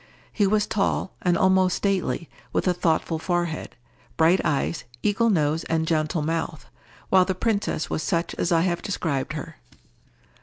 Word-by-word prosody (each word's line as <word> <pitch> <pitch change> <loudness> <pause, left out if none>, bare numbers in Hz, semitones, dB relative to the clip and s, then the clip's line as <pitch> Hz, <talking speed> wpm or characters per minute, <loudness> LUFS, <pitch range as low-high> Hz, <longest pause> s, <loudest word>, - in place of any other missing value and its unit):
He 205 -3 +2
was 210 +1 +2
tall, 195 -2 -1
and 175 -1 +2
almost 185 -1 +3
stately, 190 -4 -1 0.2
with - - 0
a 180 - +4
thoughtful 165 -1 0
forehead, 175 -2 -2 0.4
bright 165 +4 +4
eyes, 145 -1 0 0.2
eagle 210 +3 +2
nose, 155 -4 +1
and 160 -1 0
gentle 155 0 0
mouth; 160 0 -3 0.4
while 190 -1 +6
the 190 0 -2
princess 205 -5 -1
was - - -2
such 170 -1 -1
as 175 - -1
I 165 -1 +4
have 175 -1 0
described 160 -9 -2
her. - - -7
175 Hz, 155 wpm, -24 LUFS, 160-190 Hz, 0.4 s, while